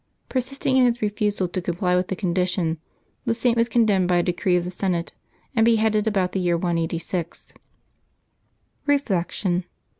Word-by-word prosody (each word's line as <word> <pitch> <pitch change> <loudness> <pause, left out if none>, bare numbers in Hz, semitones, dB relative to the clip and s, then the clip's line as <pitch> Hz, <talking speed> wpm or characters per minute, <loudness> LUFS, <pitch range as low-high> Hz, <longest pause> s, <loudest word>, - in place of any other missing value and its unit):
Persisting 260 +1 0
in 255 - +6
his 240 -1 +1
refusal 205 -2 0
to 185 - -3
comply 180 +1 0
with 180 0 +1
the 190 - -2
condition, 175 -3 0 0.5
the 230 - +1
Saint 235 0 +2
was 230 0 +2
condemned 210 -6 +3
by 180 - +2
a 175 - +3
decree 180 +1 +1
of 175 - +1
the 180 - -4
Senate, 180 -2 -2 0.4
and 225 - +4
be 230 0 +5
headed 215 -1 +1
about' 190 -4 +1
the 195 - -1
year 175 -2 +1
186. 170 0 -3 1.3
Reflection. 190 -9 0
190 Hz, 160 wpm, -23 LUFS, 175-225 Hz, 1.3 s, in